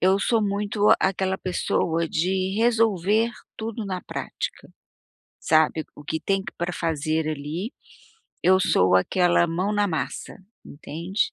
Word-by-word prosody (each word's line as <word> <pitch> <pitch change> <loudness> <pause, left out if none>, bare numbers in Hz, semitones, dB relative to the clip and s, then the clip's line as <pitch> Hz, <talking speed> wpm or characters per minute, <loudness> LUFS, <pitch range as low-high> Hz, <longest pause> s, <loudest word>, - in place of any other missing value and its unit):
eu 190 +2 +4
sou 225 +2 +2
muito 205 +1 0
aquela 190 0 0
pessoa 170 -2 0
de 185 +3 0
resolver 225 -1 +2 0.3
tudo 225 0 -4
na 185 -2 -3
prática, - - -6 0.7
sabe? 155 0 +3
O 145 - -12
que 160 +2 -3
tem 195 -1 0
pra 175 +1 -2
fazer 160 -1 -1
ali, 155 - -4 0.7
eu 185 +1 +5
sou 90 - +3
aquela 175 - +3
mão 180 +5 -1
na 205 -1 +2
massa, 145 -7 -4 0.3
entende? 170 +7 -3
185 Hz, 125 wpm, -24 LUFS, 160-200 Hz, 0.7 s, eu